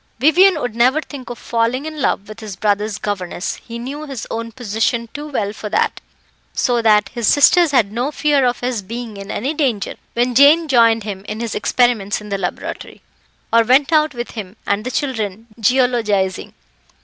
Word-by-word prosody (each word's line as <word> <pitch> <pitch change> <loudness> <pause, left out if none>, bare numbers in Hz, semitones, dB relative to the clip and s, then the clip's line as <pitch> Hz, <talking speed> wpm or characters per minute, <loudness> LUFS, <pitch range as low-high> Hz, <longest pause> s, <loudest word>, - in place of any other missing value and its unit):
Vivian 320 +7 +5
would 245 -5 -4
never 255 +5 +3
think 280 -4 -9
of 240 - -6
falling 235 +4 -1
in 310 -2 -6
love 200 - 0
with 215 +1 -10
his 215 -4 -7
brother's 210 +1 0
governess 185 -3 -4
he 235 0 -9
knew 280 +6 -6
his 265 -5 -6
own 230 0 -4
position 230 0 -1
too 295 +1 -6
well 210 -8 -2
for 215 -1 -7
that: - - 0 0.5
so 240 -2 +1
that 210 -2 +4
his 235 -4 -3
sisters 330 +4 +5
had 235 -8 +2
no 245 +5 -1
fear 295 -2 +2
of 245 -1 0
his 245 -3 -2
being 230 +2 -7
in 200 0 -9
any 265 +9 -2
danger 255 -10 -1 0.2
when 245 +1 +1
Jane 295 +6 +6
joined 230 -4 +4
him 195 -2 -6
in 215 +1 -5
his 230 -1 -3
experiments 220 -3 +1
in 210 0 -11
the 200 -1 -2
laboratory, 180 -2 -5 0.5
or 230 - +7
went 270 +7 +3
out 305 -3 +3
with 240 0 -5
him 205 -3 -7
and 200 +1 0
the - - -2
children 225 -6 -3
geologising. 225 -5 +1
235 Hz, 185 wpm, -18 LUFS, 210-265 Hz, 0.5 s, or